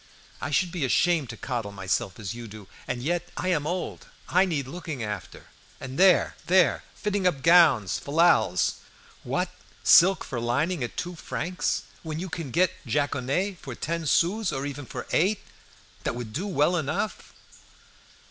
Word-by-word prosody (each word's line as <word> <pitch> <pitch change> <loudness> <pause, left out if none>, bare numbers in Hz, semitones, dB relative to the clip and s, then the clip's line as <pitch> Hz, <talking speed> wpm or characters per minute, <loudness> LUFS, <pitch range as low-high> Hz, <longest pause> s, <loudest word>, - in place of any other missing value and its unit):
I 145 - -3
should 175 +4 +1
be 175 -4 -3
ashamed 155 +1 +2
to 115 - -7
coddle 120 -5 -3
myself 95 -1 -2
as 100 -1 -4
you 120 0 -8
do! 105 -2 -11 0.2
And 125 -1 -3
yet 175 +3 -1
I 185 - -1
am 150 -5 +1
old. 180 +2 -4 0.2
I 185 +2 +4
need 155 -7 -2
looking 155 -3 -6
after. 105 -1 -6 0.3
And 130 +4 -7
there! 190 -2 +5
there! 185 0 +4
fitting 205 -3 0
up 140 -7 -1
gowns! 155 - +5
fallals! 140 - +3 0.4
What! - - -2 0.3
silk 190 +2 +6
for 125 - -4
lining 140 +7 0
at 120 - -6
two 175 0 -3
francs, 175 +1 -2 0.2
when 155 -2 -5
you 185 +3 -4
can 165 -4 -5
get 180 +7 +3
jaconet 145 - -1
for 130 -3 -7
ten 165 +3 -3
sous, 185 +6 +2
or 135 -1 -3
even 145 -1 -6
for 125 - -6
eight, 190 +6 +2 0.6
that - - -1
would 120 -3 -6
do 185 - -2
well 175 -1 +2
enough!" 170 +8 -3
155 Hz, 165 wpm, -26 LUFS, 125-180 Hz, 0.6 s, silk